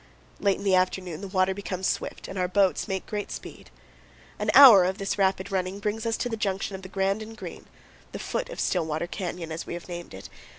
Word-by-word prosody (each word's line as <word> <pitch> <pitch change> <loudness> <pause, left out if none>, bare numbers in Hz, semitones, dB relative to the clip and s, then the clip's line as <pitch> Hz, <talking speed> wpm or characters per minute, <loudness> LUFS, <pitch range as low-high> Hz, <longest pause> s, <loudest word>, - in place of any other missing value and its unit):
Late 200 -1 +2
in - - -8
the 195 -2 +2
afternoon 185 -2 0
the 200 - -5
water 190 0 +1
becomes 190 -1 -4
swift - - -2
and 190 - -5
our 180 - +1
boats 190 +2 +2
make 190 -2 -3
great 210 -1 -4
speed.. - - -9 0.7
An - - -1
hour 235 -10 +10
of 190 +2 0
this 195 0 -2
rapid 190 0 +1
running 190 0 -1
brings 215 +2 -2
us 225 - 0
to - - -1
the 230 - -2
junction 195 -2 -2
of 190 - -8
the 190 - -10
Grand 195 +2 0
and 220 +1 -9
Green, - - -9 0.4
the - - -5
foot - - -3
of - - -8
Stillwater 160 -2 0
Canyon, 175 -2 -5
as 160 +1 -5
we - - -4
have 175 - -8
named 175 - -7
it. 95 - -9
190 Hz, 225 wpm, -26 LUFS, 185-200 Hz, 0.7 s, hour